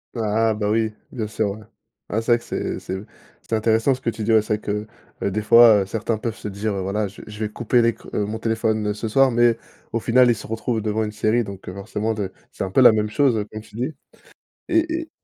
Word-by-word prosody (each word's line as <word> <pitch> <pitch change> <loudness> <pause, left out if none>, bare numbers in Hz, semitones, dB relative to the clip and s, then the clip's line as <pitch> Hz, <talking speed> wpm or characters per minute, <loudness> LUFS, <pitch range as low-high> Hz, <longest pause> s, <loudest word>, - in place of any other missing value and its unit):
Ah 110 0 +1
bah, 105 -1 -2
oui, 110 0 +1 0.2
bien 115 -4 -3
sûr, 105 0 -1
ouais. 105 +2 -10 0.4
Ah, 110 - 0
c'est 120 +1 +3
vrai - - +4
que 120 - -14
c'est - - -3
c'est 95 +1 -5 0.4
c'est - - -8
intéressant 110 +4 +2
ce 130 - -14
que 115 - 0
tu 110 -1 -6
dis. 110 - +1
Ouais, 110 -1 +5
c'est 105 0 0
vrai - - -18
que, 105 +1 -3 0.4
heu, 100 - 0
des 110 +3 -1
fois, 110 -1 +7
heu, - - -2
certains 110 +1 -2
peuvent 115 -1 -3
se 105 - -7
dire: 105 +2 -3
«Voilà, 100 +2 -1
je 100 - -12
je 105 0 -10
vais 110 -1 -1
couper 120 +2 +1
l'ec 115 0 +1
heu, 105 - 0
mon 105 +2 -4
téléphone 110 -2 0
ce 105 +2 -4
soir», 135 +4 +4
mais 120 -1 +4 0.3
au 115 - 0
final, 125 +2 +4
ils 120 - +4
se 110 - -9
retrouvent 115 +1 -2
devant 110 +1 0
une 105 - -3
série. 110 +3 +1
Donc, 100 -2 -9
heu, 90 - -5
forcément, 105 +3 -3
d 105 -3 -2 0.2
c'est - - -4
un 95 - -3
peu 95 - +3
la 125 - +9
même 105 -1 0
chose, 120 -2 +2
comme 110 - -6
tu 105 - -17
dis. 130 +7 -3 0.7
Et 330 -1 +2
et 320 - -10
110 Hz, 255 wpm, -22 LUFS, 105-115 Hz, 0.7 s, la